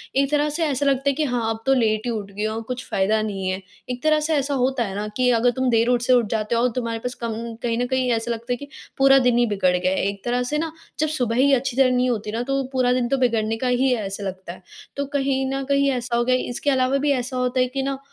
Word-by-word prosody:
एक 275 +1 +2
तरह 295 0 +2
से 325 +3 -2
ऐसा 285 -1 -1
लगता 275 0 +2
है - - +1
कि 310 - 0
हाँ 240 -3 -1
अब 225 0 -3
तो 270 - +4
लेट 220 -3 +1
ही 240 - -1
उठ 205 -3 -5
गई 210 +2 -4
हूँ, 220 +1 -2
कुछ 250 +2 -6
फ़ायदा 215 +3 +1
नहीं 195 -3 -3
है। 190 +1 -3 0.3
एक 250 +2 -5
तरह 310 0 +4
से 315 +1 0
ऐसा 280 0 0
होता 260 -1 +1
है 195 -2 -5
ना 210 +1 -3
कि 250 -1 +3
अगर 240 +2 +3
तुम 260 0 0
देर 230 0 +3
उठ 245 -1 +2
से 255 +1 +3
उठ 240 -3 +4
जाते 220 +1 -1
हो 230 - +2
और 250 - +3
तुम्हारे 230 -2 -2
पास 250 +1 -4
कम 230 -1 -1 0.3
कहीं 230 -1 0
न - - 0
कहीं 260 -1 0
ऐसा 230 +1 -1
लगता 235 +2 -5
है - - -3
कि 285 - -9 0.3
पूरा 270 0 +6
दिन 250 -2 +2
ही 240 - +4
बिगड़ 195 -4 +1
गया 185 +1 0
है, 190 - 0
एक 200 -1 -4
तरह 245 +1 0
से 295 +5 -2
ना 320 0 -2 0.3
जब 310 - +2
सुबह 245 -7 -1
ही 275 +2 +4
अच्छी 265 0 0
तरह 260 -2 +5
नहीं 250 0 +2
होती 215 -2 -2
ना 230 +2 -2
तो 275 +1 -1
पूरा 255 -1 +2
दिन 250 -1 0
तो 275 - +1
बिगड़ने 225 -3 +1
का 255 - -2
ही 250 +2 +2
है 220 -5 0
ऐसा 195 +1 -5
लगता 185 -2 -6
है। 185 - -15 0.4
तो 280 - -1
कहीं 270 -1 0
न 270 0 -2
कहीं 280 0 +3
ऐसा 245 -2 -2
हो 240 - +2
गया 255 0 +3
है, - - 0
इसके 245 +4 -2
अलावा 260 0 +2
भी 285 +1 +1
ऐसा 255 0 -2
होता 250 0 0
है 255 - +3
कि 270 +2 -3
ना 275 0 -2
250 Hz, 300 wpm, -22 LUFS, 225-270 Hz, 0.4 s, पूरा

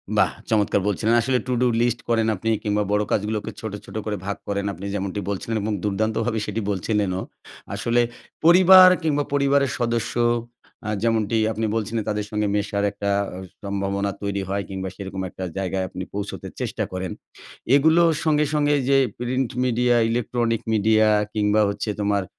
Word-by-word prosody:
বাহ! - - +3 0.2
চমৎকার 105 -2 +2
বলছিলেন। 110 +3 +1
আসলে 130 +2 +1
টুডু 125 0 +1
লিস্ট 120 0 +1
করেন 115 -1 +2
আপনি 110 +4 -3
কিংবা 105 0 +1
বড় 105 0 +2
কাজগুলোকে 105 +1 -1
ছোট, 110 -2 -5
ছোট - - -12
করে 105 -1 -2
ভাগ 100 +1 -3
করেন 100 0 -2
আপনি, 95 +4 -8
যেমনটি 100 0 -3
বলছিলেন 100 +3 -3
এবং 105 +1 -2
দুর্দান্তভাবে 110 +3 0
সেটি 105 +2 -3
বলছিলেনও। 95 -1 -1 0.5
আসলে 120 +1 +1 0.4
পরিবার 185 +1 +9
কিংবা 145 -2 +1
পরিবারের 140 -1 +2
সদস্য 115 -2 -1 0.7
আ - - -1
যেমনটি 115 -1 +1
আপনি 110 +1 -2
বলছিলেন 110 0 -2
তাদের 105 0 -2
সঙ্গে 105 -1 0
মেশার 100 0 -1
একটা 100 0 -3 0.3
অ - - -7 0.3
সম্ভাবনা 100 0 -2
তৈরি 100 -1 -2
হয় 100 +1 -1
কিংবা 95 -1 -4
সেরকম 95 -1 -6
একটা 95 - -8
জায়গায় 95 0 -1
আপনি 95 - -6
পৌঁছতে 100 0 -5
চেষ্টা - - -2
করেন। 95 -1 -4 0.6
এগুলো 160 +4 +5 0.2
সঙ্গে, 150 -1 +3
সঙ্গে 145 -1 +2
এইযে 135 +1 +2 0.2
প্রিন্ট 125 +1 -1
মিডিয়া, 125 -1 +2
ইলেকট্রনিক 120 -1 0
মিডিয়া 110 +1 +4 0.3
কিংবা 105 0 +2
হচ্ছে 100 +2 -3
তোমার 100 -1 +1
110 Hz, 160 wpm, -23 LUFS, 100-120 Hz, 0.7 s, পরিবার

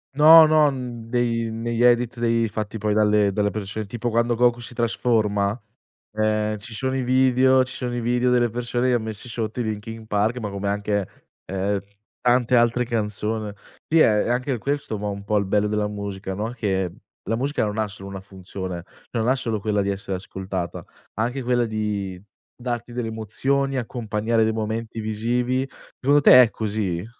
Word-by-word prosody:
No, 160 +2 +9
no, 155 -1 +5
n 120 -3 -7
dei 115 -2 0
negli 115 +1 -1
edit 120 0 +3
dei 115 -1 +2
fatti 110 +1 -4
poi 105 0 0
dalle 105 -1 +3
dalle 105 0 0
persone, 105 +1 -4
tipo 120 +3 -3
quando 115 +1 +1
Goku 120 0 +3
si 120 - -6
trasforma, 110 -3 0 0.5
ehm, 110 0 0
ci 110 +2 -9
sono 130 +3 -1
i 130 - 0
video 130 0 +4
ci 130 - -8
sono 120 -1 -3
i 120 - -2
video 125 +1 +1
delle 120 -2 +3
persone 120 +2 -1
che 125 - +3
han 115 - +1
messi 110 +2 -6
sotto 115 +1 -3
i - - +2
Linkin 110 +1 -5
Park, 105 +3 +1
ma 105 -3 -4
come 100 0 -3
anche, 100 -1 -1 0.4
ehm, 95 +1 -1 0.4
tante 125 0 +3
altre 120 +1 +3
canzone. 105 -2 -2 0.3
Sì 160 0 +4
è 105 -5 +4
è - - -3
anche 125 0 0
questo 140 -5 -2
ma 105 0 -3
un 100 0 -5
po' 105 +1 0
il 100 - -1
bello 105 +1 +1
della 105 0 0
musica, 100 -2 -5
no, 110 +4 -3
che 95 -7 -1 0.3
la 115 - -2
musica 140 -1 0
non 105 +1 -3
ha 110 -1 0
solo 100 0 -9
una 95 -1 -6
funzione, 95 -2 -7 0.3
non 115 0 0
ha 130 - +4
solo 115 -4 -2
quella 105 0 0
di 100 - -1
essere 95 -1 -3
ascoltata, 95 -2 -5 0.3
anche 120 +5 -2
quella 120 0 +1
di 105 -4 -3 0.4
darti 120 -1 -4
delle 120 -2 -3
emozioni, 135 +5 -1
accompagnare 115 -2 -1
dei 110 0 +2
momenti 110 +1 -3
visivi. 120 +4 -1 0.3
Secondo 145 +2 +4
te 125 -2 +9
è 115 - +3
così? 100 -4 -2
110 Hz, 185 wpm, -23 LUFS, 105-120 Hz, 0.5 s, No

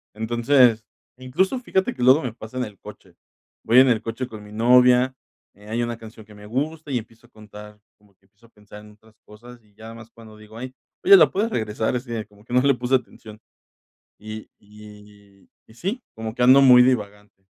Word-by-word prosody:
Entonces, 120 +1 +2 0.3
incluso, 180 - -1
fíjate 190 -6 -2
que 125 - -9
luego 130 +5 +5
me 125 -3 -5
pasa 110 +2 -11
en 130 - -1
el 105 -3 -13
coche, - - -15 0.5
voy 115 - +2
en 130 0 +5
el 115 -3 +1
coche 115 +3 -5
con 110 -3 -11
mi 105 - -14
novia, 125 +3 +4 0.4
eh, 105 +1 -19
hay 115 +2 -2
una 120 -1 -5
canción 110 -1 -13
que 105 - -17
me 105 0 -14
gusta 150 +6 -4
y 130 - 0
empiezo 115 +1 -17
a - - -37
contar, 105 0 -14 0.2
como 105 -1 -29
que 95 - -37
empiezo 105 +4 -25
a - - -30
pensar 105 -1 -15
en 105 0 -16
otras 110 +1 -25
cosas 120 +3 -16
y 105 -1 -30
ya 110 +2 -12
más 115 0 -13
cuando 110 -2 -16
digo: 110 +1 -15
"Ay, 130 +2 -8 0.3
oye, 395 +2 +8
la - - +5
puedes 215 +4 -2
regresar, 110 - -2
es 125 +1 -5 0.2
como 105 -1 -22
que 120 - -10
no 125 - +4
le 140 +1 +3
puse 125 +2 0
atención", 110 -3 -7 0.8
y 110 +1 -10
y 105 -1 -18 0.2
y 110 - -19
sí, 195 - -4
como 110 -1 -6
que 125 - -1
ando 130 +3 +6
muy 125 -2 +7
divagante. 105 -5 -3
115 Hz, 210 wpm, -22 LUFS, 105-125 Hz, 0.8 s, oye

